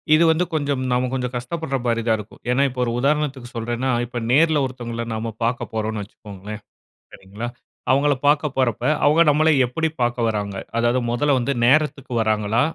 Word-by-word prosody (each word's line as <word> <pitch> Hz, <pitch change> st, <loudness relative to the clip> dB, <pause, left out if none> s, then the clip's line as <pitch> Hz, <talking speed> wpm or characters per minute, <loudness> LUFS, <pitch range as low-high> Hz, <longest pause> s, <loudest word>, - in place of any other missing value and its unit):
இது 165 Hz, -, +4 dB
வந்து 175 Hz, +3 st, +1 dB
கொஞ்சம் 145 Hz, -3 st, 0 dB
நம்ப 125 Hz, +1 st, +1 dB
கொஞ்சம் 125 Hz, -1 st, -2 dB
கஷ்டப்படுற 135 Hz, +3 st, -3 dB
மாரி 115 Hz, -1 st, +1 dB
தான் 110 Hz, -1 st, +3 dB
இருக்கும். 105 Hz, 0 st, -11 dB
ஏன்னா, 135 Hz, +3 st, +3 dB
இப்போ 125 Hz, 0 st, -4 dB
ஒரு 120 Hz, -, -1 dB
உதாரணத்துக்கு 140 Hz, -2 st, 0 dB
சொல்லுறேன்னா, 120 Hz, +3 st, -2 dB, 0.2 s
இப்போ 120 Hz, 0 st, -5 dB
நேர்ல 155 Hz, +1 st, +4 dB
ஒருத்தவங்கள்ல 120 Hz, -2 st, -5 dB
நாம்ப 110 Hz, +1 st, -3 dB
பார்க்க 120 Hz, +1 st, -2 dB
போறோம்னு 110 Hz, -1 st, -2 dB
வைச்சுக்கோங்களேன், 105 Hz, +1 st, -10 dB, 0.5 s
சரிங்களா? 100 Hz, +5 st, -7 dB, 0.4 s
அவங்கள 145 Hz, +2 st, +3 dB
பார்க்க 150 Hz, +1 st, +3 dB
போறப்ப 120 Hz, -3 st, 0 dB, 0.2 s
அவங்க 155 Hz, +3 st, +4 dB
நம்பள 155 Hz, +2 st, +4 dB, 0.2 s
எப்படி 160 Hz, +7 st, -1 dB
பார்க்க 120 Hz, -1 st, +1 dB
வர்றாங்க? 105 Hz, -3 st, -2 dB, 0.2 s
அதாவது 120 Hz, +2 st, +2 dB
மொதல 145 Hz, +3 st, +2 dB
வந்து 125 Hz, +3 st, 0 dB
நேரத்துக்கு 140 Hz, -1 st, +2 dB
வராங்களா? 110 Hz, 0 st, +1 dB
125 Hz, 165 wpm, -22 LUFS, 115-145 Hz, 0.5 s, இது